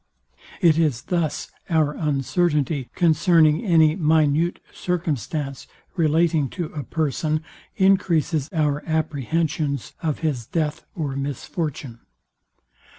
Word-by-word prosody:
It 165 -3 +5
is 145 -7 +1
thus 165 -5 -2 0.2
our 155 -3 +2
uncertainty 150 -1 0
concerning 165 0 +4
any 160 -6 +4
minute 160 0 +2
circumstance 150 - -3 0.3
relating 160 -3 +2
to 170 -4 -4
a 150 - -4
person 155 +1 -1 0.3
encreases 170 -6 +2
our 150 -3 0
apprehensions 155 -2 -1
of 155 -3 -2
his 140 -8 -2
death 155 -3 -2
or 145 -5 -3
misfortune. 140 -2 -4
155 Hz, 95 wpm, -23 LUFS, 145-165 Hz, 0.3 s, It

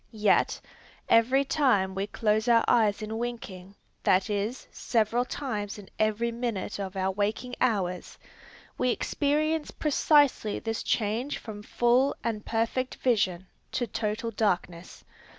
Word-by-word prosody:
Yet, - - 0 0.5
every 255 +5 +4
time 255 -10 +2
we 195 +1 -2
close 215 +2 0
our 230 -1 +5
eyes 215 -3 +3
in 220 +1 -4
winking, 205 -6 -6 0.3
that 190 +3 +2
is, 205 +5 -3
several 230 +1 +1
times 215 -7 -4
in 205 -2 -12
every 215 +2 +1
minute 230 -4 -3
of 195 -1 -5
our 190 0 0
waking 210 +5 -2
hours, 190 -7 -1 0.6
we 250 - +2
experience 300 +4 0
precisely 290 -7 +2
this 225 -1 -3
change 230 +6 -1
from 210 -2 -8
full 240 +5 +2
and 215 -3 -2
perfect 230 +3 -1
vision 190 -7 0 0.3
to 245 - 0
total 220 +1 -3
darkness. 180 -5 -2
225 Hz, 130 wpm, -28 LUFS, 205-245 Hz, 0.6 s, our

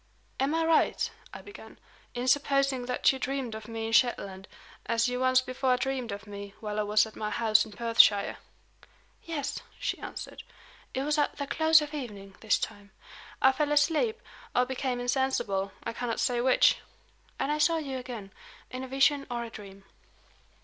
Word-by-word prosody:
"Am 275 +4 +1
I 325 0 +1
right," 325 -1 +2 0.2
I - - -10
began, 410 +1 -12 0.4
"in 245 +1 -2
supposing 275 -2 +2
that 250 - +3
you 265 - -6
dreamed 265 -3 -3
of 220 0 -8
me 225 -1 -4
in 225 - -3
Shetland, 200 -6 +1 0.4
as 230 +1 +2
you 250 0 -2
once 255 0 +4
before 255 0 0
dreamed 260 -3 -2
of 200 +1 -6
me 200 -1 -9
while 210 -1 -4
I - - +3
was 210 +1 +3
at 220 - -12
my 210 - -3
house 220 -1 +3
in 220 - -12
Perthshire?" 225 -3 +4 0.9
"Yes," 300 -4 -3 0.2
she - - -2
answered. - - -7 0.5
"It 265 - 0
was 300 +1 +1
at 295 - 0
the 285 - -2
close 315 +2 +4
of 295 0 -8
evening, 205 -9 -7
this 220 - +2
time. 205 0 -6 0.5
I 265 - +8
fell 295 +2 -1
asleep, 325 +10 +2 0.4
or 250 - +4
became 260 -1 -2
insensible 245 -6 0
I 230 - -4
cannot 235 -1 -3
say 245 -2 +1
which. 255 0 +5 0.6
And 270 +2 -1
I 300 - 0
saw 330 +2 +3
you 275 -4 -4
again, 235 -6 -8 0.4
in 255 +1 -5
a - - -6
vision 275 +2 +2
or 240 -1 -3
a 230 - -8
dream." 195 -2 -11
250 Hz, 180 wpm, -29 LUFS, 220-275 Hz, 0.9 s, I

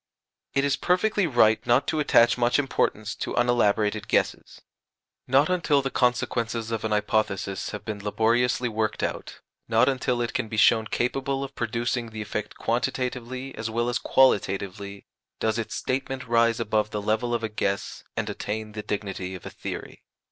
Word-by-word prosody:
It 140 - +3
is 140 - +1
perfectly 185 +1 +2
right 110 -6 +4
not 120 +3 +4
to 155 - 0
attach 120 -6 +5
much 120 0 +2
importance 110 -6 0
to - - -3
unelaborated 110 -3 +2
guesses. - - -1 0.7
Not 135 +4 +4
until 165 -6 +2
the 135 - -2
consequences 115 -2 0
of 115 -2 -2
an 110 - -1
hypothesis 100 -2 0
have 105 - -7
been 105 -2 -5
laboriously 120 +4 +2
worked 110 -1 -1
out - - -4 0.3
not 115 +2 +4
until 130 -2 0
it 120 - -3
can 125 - -1
be 110 - -5
shown 110 0 +5
capable 135 +4 -1
of 135 0 -7
producing 120 0 -2
the 110 -1 -6
effect 105 0 -5
quantitatively 125 +2 -2
as 110 +1 -4
well 120 +2 0
as 120 - 0
qualitatively 100 -5 +1 0.3
does 110 0 0
its 115 - -4
statement 130 0 -3
rise 115 0 +3
above 110 -1 0
the 105 - -3
level 110 +4 0
of 115 - -3
a - - +1
guess, 100 -2 -2
and - - -1
attain 110 +1 -4
the 105 0 -5
dignity 95 -3 -4
of 90 - -10
a - - -6
theory. - - -7
115 Hz, 170 wpm, -26 LUFS, 105-125 Hz, 0.7 s, attach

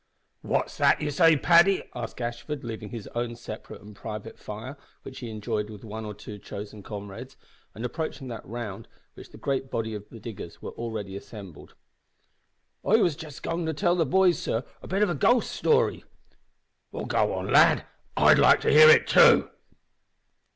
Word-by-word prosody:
"What's - - -2
that - - +4
you 150 -1 -2
say, 165 +1 +5
Paddy?" 175 +5 +5
asked 120 -2 -6
Gashford, 120 +4 -5
leaving 110 -3 -6
his 115 -4 -7
own 120 0 -3
separate 110 -3 -9
and 105 0 -13
private 110 +1 -8
fire, 110 +7 -8 0.3
which 130 - -9
he 120 - -6
enjoyed 105 -1 -3
with 105 -2 -11
one 110 +1 -6
or 105 -1 -6
two 105 0 -10
chosen 100 +1 -8
comrades, 105 +6 -9 0.4
and 115 - -5
approaching 155 -1 -5
that 115 -2 -7
round 115 -3 -7 0.3
which - - -13
the - - -14
great 135 -1 -2
body 110 -2 -3
of 105 -1 -8
the 115 - -11
diggers 105 -6 -9
were - - -7
already 110 -4 -6
assembled. 100 -5 -11 1.1
"I 215 - +3
was 180 -9 +3
just 155 -3 -10
goin' 165 0 -2
to 160 - -1
tell 175 +2 +2
the 165 -4 +1
boys, 185 +3 +3
sor, 115 - -2 0.2
a - - -10
bit 195 +3 +1
of 210 - +2
a - - 0
ghost 235 - +2
story." 465 +1 +1 0.9
"Well, - - -5
go - - +1
on, - - -3
lad, - - +5 0.3
I'd - - +6
like - - +6
to - - +2
hear 465 0 +9
it, 460 - +7
too." 475 0 +6
120 Hz, 180 wpm, -26 LUFS, 105-160 Hz, 1.1 s, hear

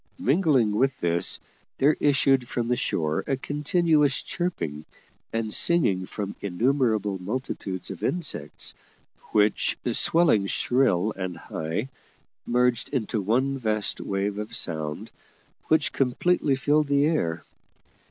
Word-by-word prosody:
Mingling 135 - +2
with 130 +6 0
this, 85 0 +1 0.4
there 145 +3 +3
issued 135 -3 +2
from 120 -1 -2
the 125 - +1
shore 80 -8 -1
a 135 - 0
continuous 150 0 +1
chirping 85 - -4 0.5
and 115 -1 -2
singing 100 - +3
from 100 -2 -5
innumerable 110 -1 0
multitudes 100 -4 -4
of 95 - -9
insects, 145 - -2 0.6
which, 105 -1 +2
swelling 155 - +4
shrill 110 -5 +1
and 95 -2 -5
high, 80 +10 -4 0.6
merged 125 0 +1
into 115 -5 -2
one 130 +7 0
vast 110 -3 0
wave 100 +1 -2
of 105 +2 -3
sound, 80 -6 -1 0.6
which 155 -1 +2
completely 140 +3 +1
filled 145 +3 +1
the 140 0 +3
air. 85 - -1
120 Hz, 115 wpm, -25 LUFS, 100-140 Hz, 0.6 s, swelling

